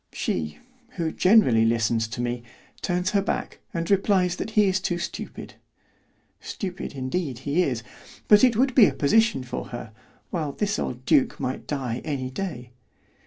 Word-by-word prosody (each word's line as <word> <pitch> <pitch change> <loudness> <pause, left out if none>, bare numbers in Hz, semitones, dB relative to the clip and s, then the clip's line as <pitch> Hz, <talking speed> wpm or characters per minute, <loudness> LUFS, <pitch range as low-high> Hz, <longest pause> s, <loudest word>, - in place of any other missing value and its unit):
She, 75 -2 -2 0.4
who 165 -2 -1
generally 180 - +5
listens 115 0 +1
to 115 +2 -5
me, 120 0 -2 0.4
turns 180 +2 0
her 200 - +3
back 200 - -3
and 170 -2 -3
replies 190 -2 +2
that - - -4
he 210 - +7
is 190 0 +2
too 175 -2 -1
stupid. 175 - -6 0.9
Stupid, 190 -2 -5
indeed, 135 +1 -3
he 145 +5 +2
is; 125 -9 -1 0.4
but 210 +2 +7
it 250 -3 +5
would 260 +1 +3
be 235 -4 +7
a - - -2
position 220 - +3
for 125 0 -5
her, 120 -2 -8 0.4
while 155 -5 -2
this 205 +4 -1
old 125 +1 -4
duke 145 -1 +3
might 130 - -4
die 130 -4 -3
any 130 -4 -3
day. 130 -7 -5
155 Hz, 165 wpm, -25 LUFS, 125-195 Hz, 0.9 s, he